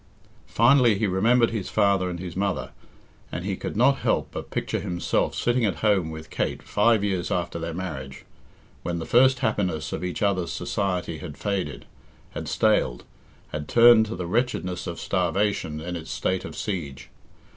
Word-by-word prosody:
Finally, 120 -2 +4
he 110 - 0
remembered 115 +5 +3
his 110 -5 -3
father 100 -3 +2
and 85 -1 -5
his 90 -2 -6
mother, 100 0 -1 0.6
and 90 - -4
he 100 -1 -1
could - - -5
not 135 +4 +4
help - - 0
but - - -6
picture - - -2
himself 85 -1 -1
sitting 120 0 +1
at 100 -5 +1
home 95 -6 +3
with 80 0 -9
Kate - - -2
five 105 0 +2
years 95 -4 -1
after 85 -1 -2
their 85 0 -4
marriage, 70 -8 -6 0.6
when 85 -1 -3
the 80 - -4
first 130 +2 +5
happiness 90 -9 -1
of - - -4
each 90 +3 -3
other's 95 -5 +1
society 90 -3 -2
had 75 -5 -8
faded, 95 -9 -3 0.5
had - - -6
staled, - - +1 0.5
had 75 -1 -5
turned 115 -2 +7
to 110 - -5
the 90 0 -4
wretchedness 90 -4 -1
of 85 - -5
starvation 90 -3 0
in 90 +3 -5
its 80 -2 -7
state 95 +6 -1
of - - -8
siege. 80 -10 -5
95 Hz, 170 wpm, -25 LUFS, 85-105 Hz, 0.6 s, turned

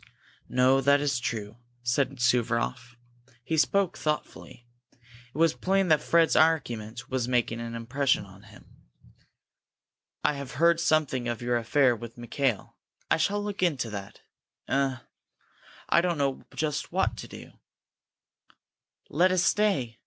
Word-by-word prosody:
"No, 130 +2 +3
that 140 +1 +4
is 140 -3 0
true," 110 -2 -4 0.3
said 135 +2 0
Suvaroff. 125 +1 0 0.5
He 160 - -2
spoke 190 +4 +2
thoughtfully. 150 -5 -4 0.3
It 120 +1 -19
was 165 0 +4
plain 195 0 0
that 155 -2 +4
Fred's 165 +1 +3
argument 120 -8 0
was 130 -2 -1
making 120 -2 0
an 115 0 -6
impression 130 +1 0
on 95 0 -16
him. 105 - -16 1.6
"I - - +2
have 140 -2 -7
heard 170 +3 +3
something 155 -7 +1
of 120 0 -3
your 120 0 0
affair 120 +2 +3
with 115 +1 -10
Mikail. 120 -2 -2 0.3
I - - +5
shall 205 +6 0
look 205 -2 -5
into 140 -10 0
that. 100 -2 -8 0.5
Eh 135 -1 0 0.9
I 170 - +5
don't 175 -2 -1
know 140 -2 -1
just 155 -2 -2
what - - 0
to - - -8
do!" - - -11 1.6
"Let 180 +5 +2
us 185 -1 +2
stay!" 175 - +1
135 Hz, 140 wpm, -27 LUFS, 120-160 Hz, 1.6 s, I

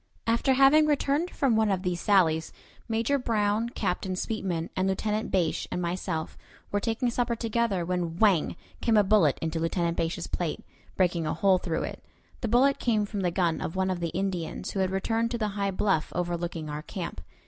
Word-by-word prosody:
After 235 +4 +2
having 280 +3 +6
returned 295 +3 +1
from 270 -9 +1
one 220 -1 +3
of 190 -2 0
these 180 -2 -1
sallies, 165 -6 +3 0.4
Major 230 +5 +1
Brown, 220 -1 0
Captain 190 -4 -2
Sweetman, 180 -5 -3
Lieutenant 210 +4 0
Bache, 175 -4 0
and - - -3
myself 175 -2 -3 0.3
were 205 - +1
taking 230 +3 -1
supper 240 0 0
together, 230 -5 0
when 175 -2 -2
"whang!" 195 -6 +3 0.3
came 225 -2 +3
a 210 - +6
bullet 190 -8 +4
into 165 0 -1
Lieutenant 170 +1 0
Bache's 165 +1 -1
plate, 170 -3 -3 0.4
breaking 175 -3 +1
a - - -1
hole 185 +2 +3
through 165 -3 -2
it. - - -6 0.4
The 235 - -2
bullet 260 +5 +3
came 215 -3 +1
from 205 0 -5
the 180 - +1
gun 170 -3 0
of 160 - -4
one 190 0 +1
of 180 - -2
the 170 -1 -2
Indians, 180 -1 -3
who 195 - -3
had 190 -1 +2
returned 225 +4 0
to 235 - -2
the 215 -2 -1
high 200 0 -1
bluff 190 -4 0
overlooking 175 -2 -2
our 150 0 -4
camp. 170 - -6
190 Hz, 190 wpm, -27 LUFS, 170-225 Hz, 0.4 s, having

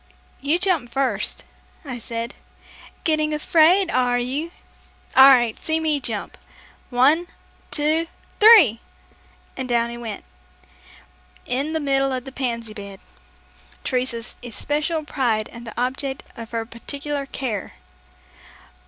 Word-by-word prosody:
"You 290 +5 +2
jump 355 -10 +1
first," 245 -6 -1 0.4
I 250 -3 -6
said. 230 +2 -4 0.7
"Getting 310 -1 +1
afraid, 340 +4 +4
are 250 -1 +2
you? 265 +7 -2 0.7
All 265 +1 +10
right, 240 -4 +4
see 320 0 +1
me 310 -2 +1
jump. 225 -6 -5 0.5
One, 285 +8 +3 0.4
two, 315 +2 +2 0.3
three!" 415 - +8 0.8
and 260 -1 -4
down 235 -1 +1
he 235 - -7
went, 225 -3 -6 1.2
in 275 +5 -1
the 320 - +1
middle 275 -2 +1
of 255 0 -4
a - - -6
pansy 235 -4 -3
bed, 200 -2 -9 0.8
Teresa's 250 -2 -2
especial 295 +6 -2
pride 235 -7 0
and 235 0 -11
the 225 - -6
object 265 +2 -2
of 230 -1 -8
her 230 -1 -3
particular 280 +5 -5
care. 240 -8 -4
265 Hz, 120 wpm, -22 LUFS, 235-300 Hz, 1.2 s, All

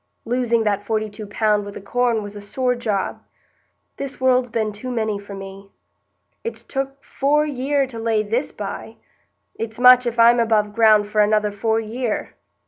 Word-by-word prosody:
Losing 235 -1 +1
that 205 -1 0
forty 215 0 -2
two 210 0 -8
pound 210 0 +1
wi' 205 - -7
the - - -7
corn 235 +2 0
was 205 0 -8
a 205 - -7
sore 250 +5 0
job. 215 -5 -2 0.8
This 275 0 -5
world's 255 -1 +2
been 220 -1 -1
too 210 +5 -7
many 220 -4 -1
for 200 0 -9
me. 195 0 -10 0.7
It's 465 - -5
took 270 0 -4
four 295 +2 +1
year 280 0 0
to 245 -3 -8
lay 225 -1 +1
this 230 +6 -1
by; - - -7 0.6
it's 225 0 -5
much 250 0 +7
if 240 0 -3
I'm 235 +1 +6
above 215 -3 +2
ground 215 -2 +5
for 210 0 +2
another 210 0 +2
four 220 +2 0
year. 225 +1 -3
225 Hz, 175 wpm, -21 LUFS, 210-250 Hz, 0.8 s, much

